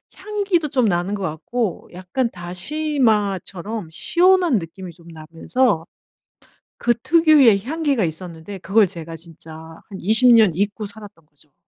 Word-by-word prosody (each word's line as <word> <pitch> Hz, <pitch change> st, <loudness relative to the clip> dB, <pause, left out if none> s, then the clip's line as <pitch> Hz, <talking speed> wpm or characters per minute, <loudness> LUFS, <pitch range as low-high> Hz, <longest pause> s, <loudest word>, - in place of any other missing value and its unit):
향기도 395 Hz, -4 st, -1 dB
좀 255 Hz, -3 st, +1 dB
나는 180 Hz, 0 st, 0 dB
것 205 Hz, -, -4 dB
같고 185 Hz, +5 st, -4 dB
약간 185 Hz, +8 st, -3 dB
다시마처럼 205 Hz, -, -1 dB
시원한 350 Hz, -, +3 dB
느낌이 180 Hz, +1 st, -8 dB
좀 170 Hz, -1 st, -19 dB
나면서 165 Hz, +5 st, -1 dB, 0.9 s
그 240 Hz, -, +1 dB
특유의 295 Hz, -, +4 dB
향기가 285 Hz, -3 st, -1 dB
있었는데 170 Hz, +3 st, -6 dB
그걸 200 Hz, +2 st, +3 dB
제가 165 Hz, -1 st, -8 dB
진짜 165 Hz, -1 st, -11 dB, 0.3 s
한 195 Hz, -3 st, -9 dB
20 225 Hz, +6 st, +4 dB
년 220 Hz, -5 st, +5 dB
잊고 205 Hz, +3 st, -2 dB
살았던 200 Hz, -5 st, -9 dB
거죠. 145 Hz, -1 st, -20 dB
205 Hz, 265 characters per minute, -20 LUFS, 170-255 Hz, 0.9 s, 년